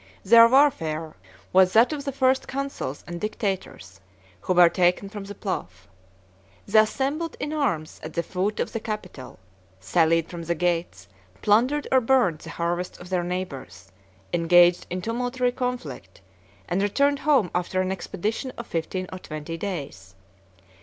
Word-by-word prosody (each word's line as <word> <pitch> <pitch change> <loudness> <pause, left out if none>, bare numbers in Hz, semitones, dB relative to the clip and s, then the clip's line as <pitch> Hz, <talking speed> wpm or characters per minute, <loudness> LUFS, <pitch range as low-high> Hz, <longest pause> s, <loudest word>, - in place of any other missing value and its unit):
Their 230 +3 +8
warfare 165 - +2 0.4
was 185 0 +5
that 230 +7 +5
of 290 -1 -5
the 275 - -1
first 260 0 +1
consuls 275 - -4
and 175 0 -7
dictators, 190 - -4 0.4
who 185 - -1
were 175 -1 +8
taken 180 +3 +1
from 205 -1 -7
the 205 +1 -8
plough. 190 - -3 1.0
The 215 +2 +6
assembled 280 +9 -2
in 295 - -3
arms 210 - -2
at 155 - -8
the 170 - 0
foot 190 +4 -2
of - - -1
the 225 - -2
Capitol; 210 - -7 0.4
sallied 160 - +2
from 170 -1 -7
the 170 +1 -2
gates, 165 - -2 0.4
plundered 250 +8 +2
or 260 -1 +5
burnt 235 - +2
the 165 - -10
harvests 170 +2 -3
of 175 - -12
their 180 -2 0
neighbors, 140 - -6 0.4
engaged 175 +1 +4
in 180 +1 -4
tumultuary 245 +2 -1
conflict, 250 0 -5 0.5
and 180 +2 0
returned 280 +8 +2
home 275 - +2
after 180 +1 -1
an 185 0 0
expedition 215 +6 -3
of 235 - -6
fifteen 180 +2 -3
or 185 - -6
twenty 155 0 -6
days. 140 - -6
185 Hz, 155 wpm, -25 LUFS, 170-245 Hz, 1.0 s, Their